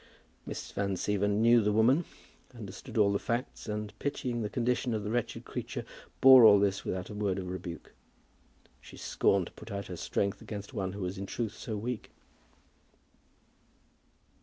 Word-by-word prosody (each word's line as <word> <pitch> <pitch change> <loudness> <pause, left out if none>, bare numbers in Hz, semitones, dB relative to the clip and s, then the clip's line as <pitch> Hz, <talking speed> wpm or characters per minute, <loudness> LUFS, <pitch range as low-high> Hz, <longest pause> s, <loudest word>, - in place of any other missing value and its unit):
Miss - - -6
Van 100 -1 -1
Siever 100 +2 0
knew 115 +3 +5
the 105 0 +2
woman, 125 +10 +4 0.5
understood 105 -1 -8
all 100 -2 +4
the 100 - +1
facts, 120 +1 -3
and 105 -1 -4
pitying 125 -4 -2
the 105 - -2
condition 120 +1 0
of 105 - -3
the 105 - -3
wretched 120 -1 -2
creature, - - -5 0.4
bore 130 -2 +10
all 105 -2 +9
this 100 0 +1
without 90 +2 -4
a - - -6
word 100 -2 -1
of 90 -2 -4
rebuke. 85 -3 -7 0.9
She - - -13
scorned 100 -2 +1
to - - -11
put 110 - -12
out 100 -2 -4
her 90 - -6
strength 100 +3 -1
against 105 +3 -7
one 95 -4 -2
who 100 - -6
was 90 +1 -3
in 100 - -5
truth 115 -1 -3
so 110 -1 -5
weak. 115 +2 -4
105 Hz, 170 wpm, -30 LUFS, 100-115 Hz, 0.9 s, bore